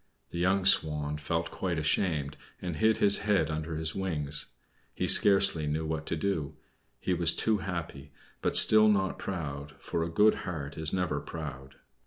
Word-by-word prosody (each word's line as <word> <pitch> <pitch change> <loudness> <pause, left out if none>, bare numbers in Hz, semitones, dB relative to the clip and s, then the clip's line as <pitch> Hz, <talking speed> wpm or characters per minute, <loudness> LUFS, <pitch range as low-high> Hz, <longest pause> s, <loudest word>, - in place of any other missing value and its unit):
The 85 - -6
young 95 +2 +1
Swan 75 -5 +2
felt 85 +3 -3
quite 90 -3 -3
ashamed, 75 -2 -1 0.2
and 85 -4 -5
hid 110 +4 +2
his 100 0 +4
head 100 -7 0
under 80 +1 -4
his 80 0 -3
wings. 75 -7 -4 0.5
He - - -2
scarcely 95 -6 +5
knew 75 +2 -2
what 80 0 -4
to - - -1
do. 80 -5 -3 0.4
He 90 - -1
was 85 -1 +3
too 110 -2 +1
happy, 85 -7 -6 0.3
but - - +2
still 110 0 +6
not 95 -2 0
proud, 75 -6 -6
for 85 - -4
a 85 - -4
good 105 +6 +4
heart 75 -6 -6
is 80 -1 +1
never 90 -6 -1
proud. 70 -3 -8
80 Hz, 170 wpm, -29 LUFS, 75-95 Hz, 0.5 s, still